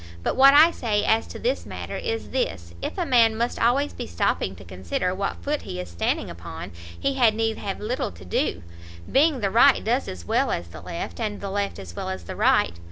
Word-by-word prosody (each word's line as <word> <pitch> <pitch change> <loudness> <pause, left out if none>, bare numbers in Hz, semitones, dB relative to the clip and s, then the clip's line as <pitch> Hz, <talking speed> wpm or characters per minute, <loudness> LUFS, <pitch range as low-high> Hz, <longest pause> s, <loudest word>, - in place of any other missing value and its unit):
But - - 0
what 275 +1 +7
I 315 +3 +8
say 210 -8 -1
as 220 0 +2
to - - -8
this - - -1
matter, - - -6
is 455 -2 -3
this, 85 - -2
if - - -4
a 355 - 0
man 230 -5 +4
must 235 +1 -1
always 270 +5 +2
be - - -6
stopping 85 +2 -1
to 95 - -12
consider 95 - -2
what 195 +1 -3
foot 295 +1 -1
he 90 - -6
is 90 -1 -6
standing 85 - -1
upon, 85 -1 -8 0.3
he 275 - 0
had 240 -5 +3
need 225 0 -1
have 195 -1 -4
little 240 +5 -2
to 90 +2 -13
do, 90 - -1 0.5
being 285 -2 +3
the 200 -1 0
right 250 +5 +5
does 245 +4 0
as 85 -2 -7
well - - +1
as 85 - -3
the 80 -1 -10
left, 170 +6 -6
and 210 -3 -2
the 200 -1 -5
left 200 0 -2
as 90 -4 -9
well - - -4
as 95 -2 -5
the - - -7
right. 85 0 +2
205 Hz, 230 wpm, -24 LUFS, -, 0.5 s, I